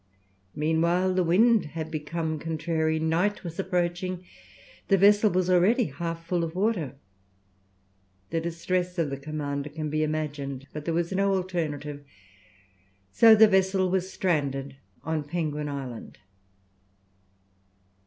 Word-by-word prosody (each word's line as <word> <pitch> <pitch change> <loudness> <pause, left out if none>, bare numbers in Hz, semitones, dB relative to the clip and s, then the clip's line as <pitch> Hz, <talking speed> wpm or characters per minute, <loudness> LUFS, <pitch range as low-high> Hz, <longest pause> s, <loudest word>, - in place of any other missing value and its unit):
Meanwhile 170 +4 +1
the 185 0 +2
wind 215 +6 +4
had 160 0 -4
become 155 +1 -3
contrary, 160 0 -1
night 170 +7 0
was 170 -1 -7
approaching, 180 0 -2 0.6
the 195 - +4
vessel 205 +2 +5
was 185 -1 0
already 185 +7 +4
half 165 +2 -5
full 175 0 0
of 165 0 -4
water. 185 - 0 1.4
The 165 - 0
distress 180 +2 -2
of 160 -4 0
the 140 - -3
commander 145 0 -4
can 155 0 -5
be 155 0 0
imagined. 145 -3 -3
But 150 -1 -6
there 165 - -1
was 170 +1 -1
no 195 +1 +2
alternative, 150 -6 -3 1.1
so 225 - +7
the 220 0 +8
vessel 190 -1 +2
was 190 0 -1
stranded 140 -6 -1 0.3
on 160 -2 -2
Penguin 150 -1 -3
Island. 135 -5 -7
165 Hz, 125 wpm, -27 LUFS, 150-185 Hz, 1.4 s, the